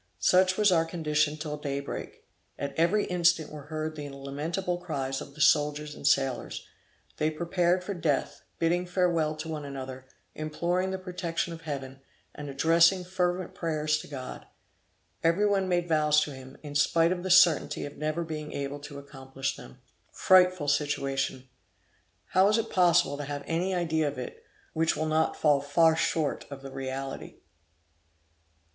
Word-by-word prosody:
Such 185 Hz, 0 st, +3 dB
was 210 Hz, -2 st, +4 dB
our 165 Hz, -2 st, +4 dB
condition 155 Hz, -2 st, 0 dB
till 150 Hz, -1 st, -4 dB
daybreak. 140 Hz, -1 st, -5 dB, 0.3 s
At 140 Hz, -, -4 dB
every 180 Hz, +6 st, +2 dB
instant 175 Hz, -3 st, +2 dB
were 150 Hz, -2 st, -9 dB
heard 155 Hz, 0 st, -3 dB
the 145 Hz, -1 st, -6 dB
lamentable 150 Hz, +7 st, -3 dB
cries 135 Hz, -5 st, -3 dB
of 140 Hz, -, -10 dB
the 155 Hz, -, -6 dB
soldiers 150 Hz, 0 st, +3 dB
and 140 Hz, -, -3 dB
sailors; 135 Hz, -2 st, 0 dB, 0.5 s
they 155 Hz, -, +1 dB
prepared 175 Hz, +3 st, 0 dB
for 200 Hz, -, -4 dB
death, 160 Hz, -6 st, -1 dB, 0.2 s
bidding 175 Hz, +2 st, +1 dB
farewell 175 Hz, -4 st, +1 dB
to 155 Hz, +1 st, -6 dB
one 155 Hz, -2 st, -4 dB
another, 130 Hz, -2 st, -7 dB, 0.3 s
imploring 170 Hz, +4 st, -1 dB
the 190 Hz, -, -2 dB
protection 180 Hz, -2 st, -3 dB
of 165 Hz, -, -9 dB
Heaven, 135 Hz, -4 st, -6 dB, 0.3 s
and 145 Hz, -1 st, -7 dB
addressing 165 Hz, +6 st, +4 dB
fervent 180 Hz, 0 st, -1 dB
prayers 155 Hz, -2 st, 0 dB
to -, -, -9 dB
God. 130 Hz, -3 st, -8 dB, 0.8 s
Every 170 Hz, +5 st, +3 dB
one 195 Hz, -2 st, +1 dB
made 175 Hz, -1 st, +1 dB
vows 150 Hz, -2 st, +4 dB
to 150 Hz, -, -2 dB
him, 130 Hz, 0 st, -11 dB
in 145 Hz, -1 st, -7 dB
spite 165 Hz, +4 st, +3 dB
of 180 Hz, -1 st, -1 dB
the 185 Hz, -, -4 dB
certainty 175 Hz, -3 st, +5 dB
of 145 Hz, -, -8 dB
never 155 Hz, +3 st, -2 dB
being 155 Hz, -2 st, -6 dB
able 140 Hz, +1 st, -4 dB
to 145 Hz, 0 st, -9 dB
accomplish 135 Hz, -1 st, -5 dB
them. 65 Hz, -, -13 dB, 0.3 s
Frightful 185 Hz, -4 st, +4 dB
situation! 135 Hz, -2 st, -1 dB, 0.8 s
How 190 Hz, +1 st, +4 dB
is 210 Hz, +2 st, +3 dB
it 225 Hz, 0 st, -2 dB
possible 175 Hz, -6 st, +3 dB
to 145 Hz, -, -5 dB
have 145 Hz, 0 st, -5 dB
any 180 Hz, +3 st, -1 dB
idea 160 Hz, -3 st, +1 dB
of 145 Hz, -, -4 dB
it, 125 Hz, -, -7 dB, 0.3 s
which 160 Hz, 0 st, +1 dB
will 155 Hz, -, -1 dB
not 155 Hz, +1 st, +1 dB
fall 145 Hz, -3 st, +3 dB
far 160 Hz, +3 st, +4 dB
short 160 Hz, -2 st, -1 dB
of 140 Hz, -1 st, -9 dB
the 135 Hz, -, -8 dB
reality! 135 Hz, 0 st, -5 dB
155 Hz, 165 wpm, -28 LUFS, 145-175 Hz, 0.8 s, certainty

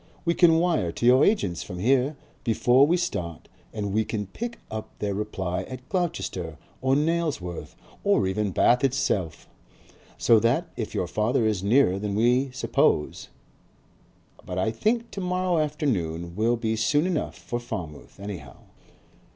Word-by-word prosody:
"We 170 Hz, -, +3 dB
can 170 Hz, -2 st, +5 dB
wire 165 Hz, -, +1 dB
to -, -, -3 dB
your 125 Hz, +2 st, +6 dB
agents 100 Hz, -, +1 dB
from 90 Hz, -, -7 dB
here 130 Hz, +8 st, +2 dB, 0.3 s
before 125 Hz, +4 st, +4 dB
we 175 Hz, +3 st, +3 dB
start 85 Hz, -, -4 dB, 0.2 s
and 100 Hz, -2 st, -3 dB
we 110 Hz, +1 st, +2 dB
can 105 Hz, -2 st, -3 dB
pick 235 Hz, -, -6 dB
up 110 Hz, 0 st, -5 dB
their 100 Hz, -1 st, -2 dB
reply 95 Hz, -3 st, -3 dB
at 130 Hz, 0 st, -9 dB
Gloucester 155 Hz, -, -2 dB, 0.2 s
or 130 Hz, +1 st, +2 dB
Nailsworth 150 Hz, -, -1 dB, 0.3 s
or 200 Hz, -, +3 dB
even 100 Hz, +2 st, 0 dB
Bath 120 Hz, +6 st, +3 dB
itself. 100 Hz, -, 0 dB, 0.7 s
So 115 Hz, -2 st, +5 dB
that 125 Hz, +10 st, +1 dB
if 110 Hz, -, -5 dB
your -, -, 0 dB
father 110 Hz, +6 st, +1 dB
is 105 Hz, -4 st, +1 dB
nearer 100 Hz, -2 st, +3 dB
than 100 Hz, -1 st, -2 dB
we 125 Hz, +5 st, +3 dB
suppose 125 Hz, -10 st, 0 dB, 1.2 s
But 90 Hz, -, -6 dB
I 95 Hz, +4 st, +1 dB
think 230 Hz, -, 0 dB
to 200 Hz, -, -5 dB
morrow 180 Hz, -1 st, 0 dB
afternoon 90 Hz, -, -1 dB
will 115 Hz, +4 st, +2 dB
be 110 Hz, -1 st, -1 dB
soon 145 Hz, +8 st, +2 dB
enough 180 Hz, -4 st, -2 dB
for 120 Hz, -, -4 dB
Falmouth, 85 Hz, -9 st, -7 dB
anyhow." 95 Hz, -9 st, -7 dB
115 Hz, 150 wpm, -26 LUFS, 95-150 Hz, 1.2 s, your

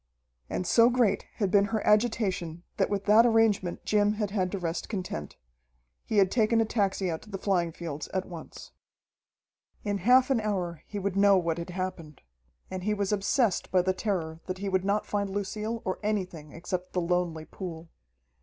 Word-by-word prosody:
And 180 Hz, -, -2 dB
so 230 Hz, +5 st, +5 dB
great 240 Hz, -5 st, +1 dB
had 200 Hz, -5 st, 0 dB
been 200 Hz, 0 st, +5 dB
her 220 Hz, 0 st, -2 dB
agitation 205 Hz, -6 st, +1 dB
that 195 Hz, -, +2 dB
with 200 Hz, -1 st, -2 dB
that 215 Hz, +2 st, +7 dB
arrangement 225 Hz, -6 st, +2 dB
Jim 210 Hz, 0 st, +3 dB
had 210 Hz, -2 st, -2 dB
had 185 Hz, -3 st, 0 dB
to 200 Hz, -, -2 dB
rest 170 Hz, -2 st, -3 dB
content. 180 Hz, -, -5 dB, 0.7 s
He 220 Hz, -, -2 dB
had 195 Hz, -2 st, +5 dB
taken 225 Hz, -1 st, +3 dB
a 225 Hz, -, +3 dB
taxi 195 Hz, -4 st, 0 dB
out 160 Hz, -, -4 dB
to 215 Hz, -, -15 dB
the 195 Hz, -, -4 dB
flying 180 Hz, -4 st, 0 dB
fields 155 Hz, -3 st, -6 dB
at 185 Hz, 0 st, -2 dB
once. 170 Hz, -3 st, -10 dB, 1.1 s
In 205 Hz, -1 st, -1 dB
half 255 Hz, +7 st, +5 dB
an 240 Hz, -4 st, +2 dB
hour 180 Hz, -6 st, -2 dB
he 210 Hz, -, -6 dB
would 200 Hz, -1 st, -2 dB
know 200 Hz, 0 st, +6 dB
what 170 Hz, -2 st, 0 dB
had 170 Hz, -, -6 dB
happened. 180 Hz, -5 st, -5 dB, 0.5 s
And 185 Hz, -1 st, -4 dB
he 210 Hz, +2 st, +1 dB
was 200 Hz, -1 st, -1 dB
obsessed 210 Hz, +1 st, +1 dB
by 185 Hz, -1 st, +3 dB
the 185 Hz, +1 st, +1 dB
terror 170 Hz, -6 st, -3 dB
that 185 Hz, 0 st, -3 dB
he 200 Hz, +1 st, -3 dB
would 190 Hz, -1 st, +1 dB
not 205 Hz, +1 st, +1 dB
find 200 Hz, -1 st, -1 dB
Lucille 210 Hz, +3 st, -3 dB
or 185 Hz, -, -2 dB
anything 185 Hz, -8 st, -3 dB
except 180 Hz, +3 st, -5 dB
the 180 Hz, -, +1 dB
lonely 170 Hz, -2 st, -1 dB
pool. 165 Hz, -3 st, -8 dB
195 Hz, 190 wpm, -28 LUFS, 175-210 Hz, 1.1 s, that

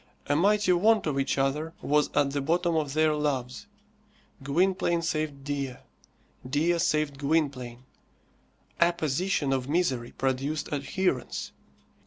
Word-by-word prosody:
A 145 Hz, -, +1 dB
mighty 205 Hz, +3 st, +3 dB
want 215 Hz, +4 st, +3 dB
of 145 Hz, -3 st, 0 dB
each 135 Hz, -, 0 dB
other 150 Hz, +4 st, 0 dB
was 150 Hz, +1 st, +2 dB
at 140 Hz, -1 st, +3 dB
the 140 Hz, 0 st, -1 dB
bottom 170 Hz, +3 st, +1 dB
of 150 Hz, -3 st, -1 dB
their 155 Hz, 0 st, +3 dB
loves, 145 Hz, +3 st, -2 dB, 0.7 s
Gwynplaine 170 Hz, +4 st, +1 dB
saved 155 Hz, -4 st, -2 dB
Dea. 140 Hz, -2 st, -3 dB, 0.7 s
Dea 165 Hz, +5 st, +1 dB
saved 150 Hz, -3 st, 0 dB
Gwynplaine. 140 Hz, -5 st, -1 dB, 1.0 s
Apposition 170 Hz, -2 st, +1 dB
of 130 Hz, 0 st, -2 dB
misery 135 Hz, -8 st, 0 dB
produced 135 Hz, +3 st, -2 dB
adherence. 145 Hz, 0 st, -2 dB
150 Hz, 120 wpm, -27 LUFS, 135-170 Hz, 1.0 s, mighty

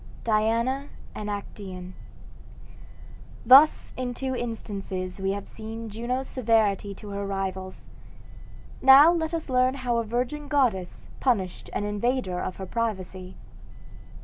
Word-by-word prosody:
DIANA 230 Hz, +5 st, +1 dB, 0.3 s
AND 210 Hz, 0 st, -5 dB
ACTAEON 190 Hz, -3 st, -7 dB, 1.5 s
Thus 275 Hz, +6 st, +7 dB
in 250 Hz, -1 st, -3 dB
two 260 Hz, 0 st, -3 dB
instances 195 Hz, -6 st, -5 dB
we 190 Hz, 0 st, -1 dB
have 200 Hz, 0 st, -6 dB
seen 225 Hz, 0 st, -8 dB
Juno's 245 Hz, +5 st, -3 dB
severity 215 Hz, -5 st, +1 dB
to 210 Hz, -, -10 dB
her 200 Hz, 0 st, -4 dB
rivals; 190 Hz, -1 st, -4 dB, 0.9 s
now 275 Hz, +5 st, +9 dB
let 320 Hz, -2 st, -1 dB
us 330 Hz, -2 st, -3 dB
learn 255 Hz, 0 st, +2 dB
how 250 Hz, -3 st, -1 dB
a 230 Hz, -, +1 dB
virgin 250 Hz, +6 st, -3 dB
goddess 240 Hz, -12 st, 0 dB
punished 200 Hz, -9 st, -1 dB
an -, -, -1 dB
invader 205 Hz, -2 st, -1 dB
of 185 Hz, -, -4 dB
her 190 Hz, -, -6 dB
privacy. 190 Hz, -4 st, -4 dB
225 Hz, 120 wpm, -26 LUFS, 195-255 Hz, 1.5 s, now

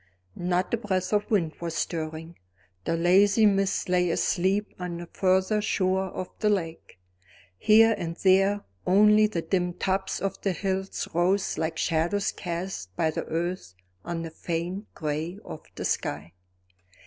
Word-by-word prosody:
Not 180 Hz, +2 st, -1 dB
a -, -, +3 dB
breath 190 Hz, -3 st, -2 dB
of 210 Hz, 0 st, +1 dB
wind 175 Hz, -8 st, +1 dB
was 170 Hz, -1 st, -3 dB
stirring; 160 Hz, 0 st, -4 dB, 0.5 s
the 165 Hz, -, 0 dB
lazy 195 Hz, +5 st, +5 dB
mist 195 Hz, -1 st, +2 dB
lay 180 Hz, -1 st, +2 dB
asleep 190 Hz, +4 st, 0 dB
on 180 Hz, -1 st, -4 dB
the 175 Hz, -, -7 dB
further 190 Hz, +4 st, +1 dB
shore 190 Hz, -2 st, +1 dB
of 185 Hz, 0 st, -5 dB
the 210 Hz, -, +2 dB
lake. 165 Hz, -, -3 dB, 0.6 s
Here 225 Hz, +1 st, +6 dB
and 170 Hz, -4 st, -4 dB
there 195 Hz, +2 st, +3 dB, 0.3 s
only 210 Hz, +3 st, +6 dB
the 170 Hz, -6 st, -3 dB
dim 180 Hz, 0 st, 0 dB
tops 190 Hz, +2 st, -1 dB
of 195 Hz, -, -3 dB
the 195 Hz, -, 0 dB
hills 190 Hz, +2 st, -2 dB
rose 185 Hz, +2 st, +1 dB
like 160 Hz, 0 st, -2 dB
shadows 170 Hz, +6 st, 0 dB
cast 170 Hz, -, -5 dB
by 160 Hz, +8 st, +1 dB
the -, -, -4 dB
earth 170 Hz, -, -3 dB, 0.3 s
on 170 Hz, -1 st, -4 dB
the 165 Hz, -, -6 dB
faint 175 Hz, +5 st, -4 dB
gray 155 Hz, +4 st, -3 dB
of 155 Hz, -, -8 dB
the -, -, -4 dB
sky. 75 Hz, +3 st, -2 dB
180 Hz, 150 wpm, -26 LUFS, 165-195 Hz, 0.6 s, Here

